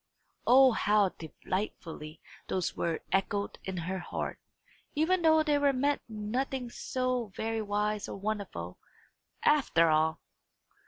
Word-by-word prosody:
O 260 +1 +8
how 210 -3 +3
delightfully 165 -2 -5 0.3
those 185 -2 -1
words 165 -1 -2
echoed 200 +1 0
in 190 -1 -4
her 185 +3 -3
heart, 175 - -4 0.6
even 340 +5 +2
though 315 -1 +5
they 295 -2 +2
meant 280 +2 +1
nothing 240 +4 -3
so 255 -2 -1
very 225 0 -2
wise 210 0 -1
or - - -5
wonderful, 195 - -4 0.6
after 175 - +4
all! 155 0 +2
210 Hz, 115 wpm, -30 LUFS, 185-255 Hz, 0.6 s, O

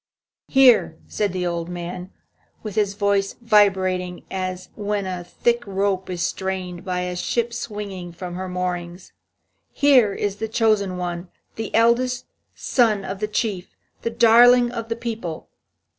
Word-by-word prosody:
"Here," 250 -11 +5
said 205 -2 -1
the 180 0 -2
old 170 -1 -2
man, 180 +1 -6 0.5
with 215 -2 -5
his 205 -1 0
voice 200 -1 +1
vibrating 190 -5 +2
as 185 -1 -4
when 205 -1 -2
a 180 -1 -4
thick 235 +7 0
rope 195 -1 -1
is 175 -2 -2
strained 185 -1 -3
by 180 -2 -2
a 180 0 -3
ship 235 +6 -1
swinging 205 -6 -6
from 175 +1 -7
her 185 +1 -5
moorings, 180 0 -4 0.6
"here 260 -7 +4
is 200 0 -2
the 220 - -3
chosen 215 -4 +1
one, 175 0 -4 0.3
the 225 -1 -4
eldest 240 +2 +2 0.3
son 215 -6 +1
of 190 +1 -5
the 210 - -1
Chief, 210 -4 -3 0.3
the 230 - -1
darling 240 +1 +6
of 230 -2 -5
the 230 - -1
people. 225 -9 -5
195 Hz, 145 wpm, -22 LUFS, 180-225 Hz, 0.6 s, darling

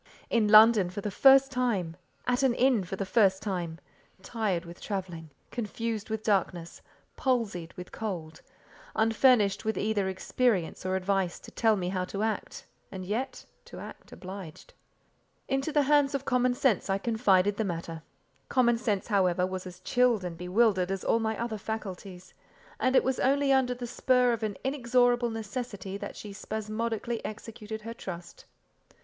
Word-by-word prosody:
In 225 -3 +3
London 215 -3 +7
for 195 +3 -6
the 210 - -3
first 270 +5 +6
time; 220 -10 -1 0.3
at 250 +1 +1
an 260 -3 +3
inn 250 -5 +3
for 180 +2 -5
the 195 - -3
first 190 -2 +3
time; 175 -5 -3 0.5
tired 195 -6 -2
with 170 +1 -11
travelling; 180 -6 -5 0.2
confused 230 -1 -4
with 220 0 -3
darkness; 180 -5 -1 0.4
palsied 220 - -1
with 180 0 -8
cold; 170 -7 -5 0.5
unfurnished 220 -2 +3
with 220 -3 -1
either 205 -2 0
experience 190 -2 -1
or 185 - 0
advice 190 -1 0
to - - -12
tell 225 -2 +3
me 180 -3 -2
how 185 -1 -1
to 200 +3 -4
act, 220 -1 -3 0.3
and 185 -1 -6
yet—to 225 +8 -6
act - - -11
obliged. 185 -4 -9 0.7
Into 270 +3 -1
the 295 -1 +3
hands 285 0 +3
of 275 0 -3
common 250 -1 +2
sense 240 -7 +1
I 195 - +2
confided 205 -3 +2
the 220 - 0
matter. 165 -3 -4 0.5
Common 240 -3 +3
sense, 210 -5 -1
however, 185 -4 +2
was 185 0 -5
as 180 - -11
chilled 245 -5 +2
and 175 -2 -5
bewildered 185 +1 +2
as 195 -1 -3
all 230 - +2
my 220 -1 -2
other 230 -2 -3
faculties, 190 -4 -7 0.5
and 255 +1 +2
it - - +6
was 265 0 -1
only 280 +1 +2
under 255 -2 +2
the 245 0 -6
spur 250 0 +2
of 230 - -3
an 215 -3 -3
inexorable 245 -2 +2
necessity 225 -3 -5
that - - -7
she 205 -2 -8
spasmodically 220 +2 -3
executed 220 0 -7
her 230 +1 -6
trust. 175 -6 -9
215 Hz, 160 wpm, -28 LUFS, 190-240 Hz, 0.7 s, London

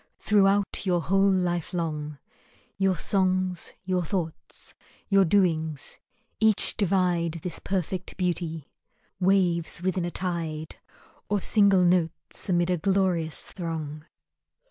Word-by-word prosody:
Throughout 200 -1 +2
your 180 -3 +1
whole 195 +4 +2
life 180 -2 0
long 150 -3 -3 0.6
Your 190 -2 +1
songs, 185 0 0
your 185 -1 0
thoughts, 165 -2 -5 0.4
your 195 -1 +5
doings, 160 -5 0 0.4
each 220 -2 +3
divide 180 -4 +1
This 180 - -3
perfect 185 -1 -3
beauty; 170 -4 -2 0.5
waves 180 -3 +1
within 185 -1 0
a - - -2
tide, 165 -4 -4 0.5
Or 205 0 +1
single 200 -2 +4
notes 175 +1 -1
amid 175 0 +2
a 180 - +1
glorious 180 -3 0
throng. 155 -4 -5
180 Hz, 110 wpm, -26 LUFS, 165-195 Hz, 0.6 s, your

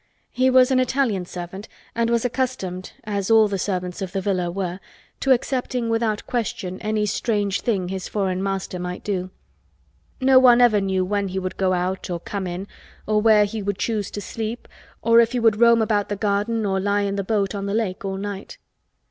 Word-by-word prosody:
He 255 +1 +2
was 255 0 +5
an 260 - +4
Italian 255 -8 0
servant 180 +4 -7 0.3
and 230 0 0
was 235 0 +1
accustomed, 240 -8 -2
as 200 -2 -2
all 220 -1 +6
the 200 -2 -3
servants 180 -2 -3
of 190 -1 -4
the 195 - 0
villa 185 -2 -1
were, 180 0 -3 0.4
to 270 - +1
accepting 250 -2 0
without 225 -2 0
question 190 -6 -3
any 215 0 0
strange 205 -1 0
thing 195 -6 -1
his 190 -1 -4
foreign 190 -3 -1
master 195 -2 -3
might 180 0 -5
do. 185 -3 -2 0.9
No 260 0 +6
one 245 -2 +6
ever 230 -4 +5
knew 190 -1 0
when 200 +1 -1
he 190 0 -5
would 185 -1 -3
go 190 -1 +1
out 185 +1 -2
or 175 -1 -2
come 195 +2 -4
in 180 +3 -5 0.4
or 210 0 +2
where 215 -1 +5
he 215 +1 -5
would 200 -1 -2
choose 215 -3 -1
to 205 - -6
sleep 225 +4 -5 0.4
or 230 0 +6
if 235 +1 +3
he 250 - +1
would 225 -2 +3
roam 235 -1 +6
about 210 -2 0
the 205 - -1
garden 210 +2 0
or 190 -1 0
lie 205 +1 +1
in 200 0 -1
the 200 - -1
boat 200 -1 0
on 200 -1 -4
the 200 - -1
lake 205 -5 -2
all 195 -1 -3
night. 200 0 -6
205 Hz, 205 wpm, -23 LUFS, 190-230 Hz, 0.9 s, all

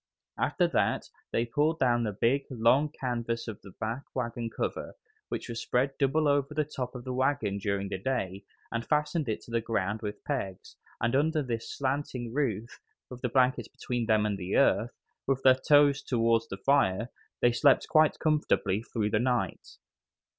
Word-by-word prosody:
After - - +2
that - - 0 0.2
they 115 - +1
pulled 150 +7 +1
down 120 -4 +2
the 110 -2 -1
big, 120 +7 +1
long 130 +5 +3
canvas 120 -4 -3
back 110 - -5
of - - -31
the 110 +6 -5
wagon 120 -2 -3
cover, - - -4 0.3
which - - -4
was 115 -1 -4
spread 135 +3 0
double 150 +2 +2
over 145 +1 +1
the 155 -1 +1
top 130 -4 -5
of 125 - -7
the 130 0 -4
wagon 125 -6 0
during 100 0 -1
the 95 - -4
day, 100 -5 -2 0.3
and 115 0 -2
fastened 150 0 0
it 110 - -2
to - - -13
the 115 0 +1
ground 110 -1 -1
with 105 -2 -6
pegs, 100 -10 -4 0.2
and 120 +3 +1
under 155 +2 +2
this 115 -3 -4
slanting 130 -4 -2
roof, 120 -6 -2 0.3
with 125 0 -9
their 125 - -1
blankets 130 +1 +2
between 120 -2 -4
them 110 -2 +3
and 100 -2 -1
the 90 +1 -3
earth, 120 -3 +2 0.3
with 135 -1 0
their 130 - +8 0.2
toes 145 -2 +6
towards 115 -2 +1
the 95 - -6
fire, 110 -2 +2 0.3
they 120 - +6
slept 135 +3 +4
quite 155 -1 +4
comfortably 150 - +1
through 110 -2 -2
the 105 - +2
night. 125 0 -2
120 Hz, 180 wpm, -29 LUFS, 110-140 Hz, 0.3 s, their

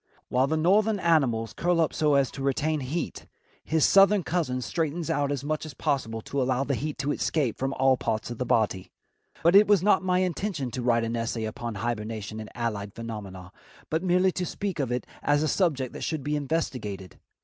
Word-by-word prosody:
While 130 +2 +2
the 160 +2 0
northern 205 +6 +3
animals 130 - +2
curl 175 0 +1
up 160 - +2
so 150 -2 +2
as 140 -2 +2
to 135 - -8
retain 150 +3 0
heat, 145 +6 -4 0.4
his 160 -1 +2
southern 195 0 +5
cousin 160 -8 -1
straightens 165 +2 -2
out 145 -2 0
as 140 -2 -2
much 155 +1 -2
as 155 -4 -8
possible 115 -6 -1
to 140 +4 -2
allow 130 +1 +1
the 140 - -1
heat 150 +3 -3
to 140 +1 -1
escape 145 -6 0
from 135 +1 -1
all 135 0 +3
parts 110 0 -2
of 120 - -7
the - - +1
body. 100 -5 +1 0.5
But 170 +3 +5
it 210 +1 +8
was 200 -4 +4
not 205 -1 +4
my 180 -1 +2
intention 175 - -2
to 125 - -4
write 120 -1 +2
an 115 +1 -2
essay 115 0 -2
upon 115 0 -5
hibernation 110 0 -4
and 110 - -7
allied 105 -4 -3
phenomena, 100 -6 -7 0.4
but 160 +1 +1
merely 185 +1 +3
to 180 - -3
speak 195 -5 -4
of 130 -4 -1
it 125 0 -2 0.2
as 145 +1 +2
a - - +1
subject 145 -7 0
that - - -8
should 155 -4 -2
be 150 +1 -1
investigated. 125 - -3
140 Hz, 205 wpm, -27 LUFS, 115-165 Hz, 0.5 s, it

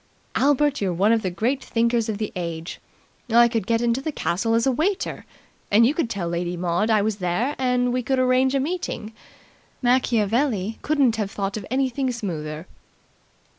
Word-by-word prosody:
"Albert, 290 0 +2
you're 195 -2 0
one 195 +5 +2
of 230 -1 +3
the 190 - -1
great 235 +10 -1
thinkers 230 0 0
of 210 - -2
the 215 -1 -4
age. 170 -2 -5 0.5
I 235 +1 +6
could 225 -4 -2
get 230 0 +1
into 240 +2 +1
the 315 - -3
castle 225 -3 0
as 230 - +2
a 265 - +3
waiter, 365 - -2 0.4
and 220 +3 +5
you 265 - +3
could 305 -7 -1
tell 195 -6 -3
Lady 175 +1 -2
Maud 175 +5 0
I 215 -2 +3
was 215 -1 -1
there, 195 +9 -1
and 250 -1 +1
we 255 - 0
could 265 +3 0
arrange 255 +1 +3
a - - +3
meeting. 280 -8 -3 0.7
Machiavelli 230 -3 +1
couldn't 275 -7 +2
have 210 -3 -1
thought 200 0 -3
of 210 -3 -6
anything 260 +1 0
smoother." 160 -8 -5
230 Hz, 180 wpm, -23 LUFS, 200-255 Hz, 0.7 s, I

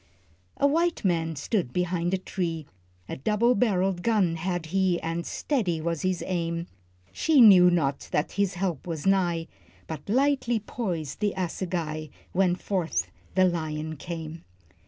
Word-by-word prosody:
A - - +2
white 330 -1 +1
man 165 -3 +1
stood 160 - -1
behind 180 0 0
a 190 - +2
tree, 170 -4 -3 0.4
A - - -5
double 215 - +2
barrelled 195 -5 +1
gun 200 -6 +2
had 175 0 -2
he, 190 -3 +2
And 165 +1 -3
steady 200 - -1
was 165 0 -2
his 185 -1 -1
aim; 170 -2 -2 0.5
She 305 - +3
knew 190 -6 +9
not 145 -6 0
that 150 - 0
his 200 -2 0
help 180 -4 -2
was 160 -4 -4
nigh, 175 -4 +2 0.4
But 160 +2 -7
lightly 255 -1 +2
poised 175 - -4
the 210 -2 0
assegai, 170 -4 -3 0.2
When 180 -1 +2
forth 180 -2 -2 0.2
the 185 0 +5
lion 155 -3 -2
came. 165 +1 -7
180 Hz, 145 wpm, -27 LUFS, 165-195 Hz, 0.5 s, knew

